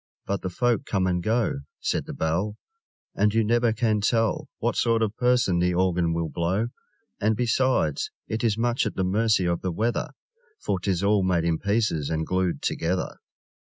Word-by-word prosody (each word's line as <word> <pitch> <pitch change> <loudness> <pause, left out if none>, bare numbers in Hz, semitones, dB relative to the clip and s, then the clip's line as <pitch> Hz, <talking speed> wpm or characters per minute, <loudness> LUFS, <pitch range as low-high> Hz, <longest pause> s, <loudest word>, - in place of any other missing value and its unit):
But 100 0 -2
the 95 - -3
folk 120 +4 0
come 95 -2 +1
and 90 -1 0
go, 110 -5 0 0.2
Said - - -1
the - - -5
Bell, 90 +7 -1 0.6
And 105 +1 +1
you 115 - +4
never 120 +1 +2
can 110 -1 +1
tell 115 0 +1
What - - -1
sort 115 -1 +2
of 110 -1 -2
person 125 -8 +2
the 90 0 +1
Organ 90 -2 +2
will 85 -1 -1
blow! 90 +9 -1 0.5
And, 110 +2 +2
besides, 120 - +1 0.2
it 110 +2 -3
is 110 -2 +2
much 120 +1 +1
at - - -5
the 95 - 0
mercy 105 0 +2
of 85 -1 0
the 95 - -2
weather 115 +7 -1 0.5
For 95 - -1
'tis 95 0 -1
all 100 0 +3
made 90 -3 +1
in 85 -1 0
pieces 100 -8 0
and 80 0 -1
glued 90 0 -1
together! - - -1
100 Hz, 185 wpm, -25 LUFS, 90-115 Hz, 0.6 s, you